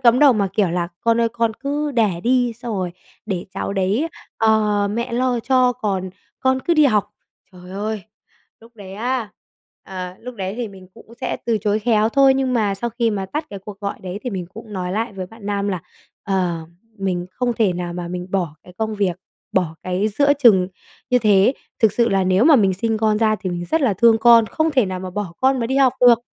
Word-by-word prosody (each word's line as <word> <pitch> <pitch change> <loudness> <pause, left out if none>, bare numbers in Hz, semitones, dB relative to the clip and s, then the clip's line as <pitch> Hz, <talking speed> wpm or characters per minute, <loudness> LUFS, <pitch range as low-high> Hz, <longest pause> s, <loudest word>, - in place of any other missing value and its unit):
cấm 245 -1 +5
đầu 285 -3 +7
mà 200 -3 0
kiểu 200 -3 +2
là 175 0 -1
"Con 230 0 +2
ơi 230 - +3
con 230 -1 -1
cứ 290 +3 -2
đẻ 210 -8 +1
đi 245 +1 +2
xong 235 -1 -6
rồi 180 -2 -2 0.3
để 185 -4 -3
cháu - - -3
đấy, 200 - 0 0.3
ờ, 210 -2 +2
mẹ 235 +3 -3
lo 245 -1 +1
cho 255 0 +3
còn 190 -4 -3 0.3
con 260 0 +2
cứ 340 - +1
đi 305 -1 +5
học." 210 -5 +1 0.4
Trời 180 0 -13
ơi, 210 +1 -3 0.6
lúc 230 +1 -19
đấy 195 -2 -10
á, 235 0 -2 0.5
à, 185 -1 -7
lúc 250 +1 -8
đấy 195 -1 -4
thì 240 -3 -3
mình 190 -2 -14
cũng 230 - -16
sẽ 255 - -2
từ 225 -2 +2
chối 210 +1 0
khéo 220 -1 +2
thôi, 270 +1 +5
nhưng 265 -1 0
mà 210 -4 +1
sau 235 +4 -3
khi 230 -1 0
mà 195 -2 -3
tắt 305 +8 -3
cái 200 - -6
cuộc 200 +1 -11
gọi 200 0 -3
đấy 185 +2 -5
thì 250 - -3
mình 185 -3 -4
cũng 220 -1 -10
nói 180 -1 -3
lại 225 +2 -2
với 185 -2 -6
bạn 225 0 -13
nam 200 0 -1
là, 185 -4 -2 0.4
ờ, 180 -5 -1 0.3
mình 180 -2 -2
không 245 +4 -1
thể 215 -5 +2
nào 175 0 -4
mà 175 -1 -5
mình 180 0 -5
bỏ 175 -6 -1
cái 180 - -15
công 220 -1 -1
việc, 190 -4 0 0.4
bỏ 175 -4 0
cái 185 +4 0
giữa 285 +7 +3
chừng 210 -10 +5 0.4
như 250 - +5
thế. 210 +3 +4 0.2
Thực 220 -3 +4
sự 235 -1 +2
là 195 -2 +2
nếu 185 +6 +3
mà 310 -3 +7
mình 195 -4 +3
sinh 220 +3 -1
con 215 -1 +2
ra 215 -1 +2
thì 185 - -3
mình 175 0 -4
rất 320 - +2
là 230 -8 +2
thương 225 +3 +5
con, 230 -1 +6
không 315 +7 0
thể 255 -8 +2
nào 185 -1 -4
mà 185 0 -6
bỏ 195 -3 -4
con 265 0 +3
mà 230 - 0
đi 265 +2 -1
học 265 -2 +5
được. 245 -2 +7
215 Hz, 230 wpm, -20 LUFS, 190-240 Hz, 0.6 s, đầu